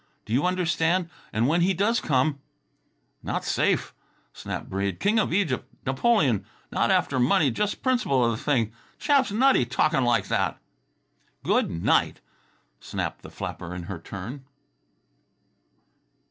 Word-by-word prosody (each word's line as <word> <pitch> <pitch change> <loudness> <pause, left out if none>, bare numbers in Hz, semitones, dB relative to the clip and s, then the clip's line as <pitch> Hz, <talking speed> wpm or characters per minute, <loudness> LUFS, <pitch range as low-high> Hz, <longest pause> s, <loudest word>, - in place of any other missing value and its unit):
Do 110 - -5
you 140 +8 +2
understand? 175 -1 +1 0.2
And 110 +3 +1
when 170 +4 +2
he 185 +2 +2
does 215 +6 +2
come 140 +1 +1 0.4
" - - -45
"Not - - -3
safe," - - +1 0.4
snapped - - -6
Breede. 95 -1 -2
"King 215 +2 +2
of 210 - 0
Egypt, 175 -9 0
Napoleon... 135 - +2 0.3
not - - +1
after 130 - +2
money, 130 +3 +3
just 205 - -2
principle 210 - +2
of 115 -1 -1
thing. 120 -7 +1 0.3
Chap's 280 -6 +2
nutty 255 - +4
talk'n' 135 +3 +1
like 115 -5 +2
that!" - - 0 0.9
"Good - - +2
night!" 85 0 +1 0.6
snapped - - -4
the - - -11
flapper 90 0 -6
in 90 - -6
her 85 0 -6
turn. 105 - -8
140 Hz, 135 wpm, -25 LUFS, 115-185 Hz, 0.9 s, nutty